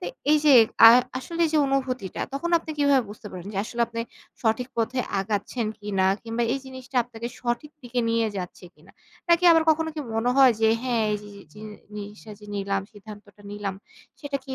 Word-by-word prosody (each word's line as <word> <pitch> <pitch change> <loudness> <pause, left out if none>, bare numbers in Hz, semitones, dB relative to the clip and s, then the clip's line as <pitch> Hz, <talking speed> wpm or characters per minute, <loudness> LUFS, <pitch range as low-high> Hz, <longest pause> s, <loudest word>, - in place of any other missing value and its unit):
তো - - -7 0.3
এই 305 - +5
যে 290 -3 +7 0.3
আ - - +10 0.3
আসলে 335 +5 -3
যে 315 - +2
অনুভূতিটা 255 -7 -2
তখন 340 +5 -2
আপনি 320 -1 -9
কিভাবে 285 -2 +4
বুঝতে 210 0 -11
পারেন? 185 0 -8
যে 195 - -3
আসলে 235 +1 -6
আপনি 230 0 -5 0.4
সঠিক 230 +3 0
পথে 230 +3 -1 0.2
আগাচ্ছেন 210 +4 -2
কিনা 195 -2 0 0.2
কিংবা 230 +1 -3
এই 275 - -1
জিনিসটা 260 0 -9
আপনাকে 235 -1 -7
সঠিক 240 +5 -3
দিকে 245 0 -2
নিয়ে 230 -1 +1
যাচ্ছে 180 0 -7
কিনা? 150 - -20 0.4
নাকি 340 +1 +4
আবার 325 -1 +4
কখনো 320 +1 +1
কি 310 - -4
মনে 225 +2 +1
হয় 265 -2 +7
যে, 220 - +4
হ্যাঁ, 235 -4 0
এই - - 0
যে, 205 - -11
যে, 200 - -12
জি-নিসটা 210 0 -10
যে - - -13
নিলাম 195 0 -1
সিদ্ধান্তটা 205 0 -13
নিলাম 205 -2 -4 0.5
সেটা 285 -2 -3
কি 265 -1 -6
230 Hz, 190 wpm, -25 LUFS, 210-265 Hz, 0.5 s, আ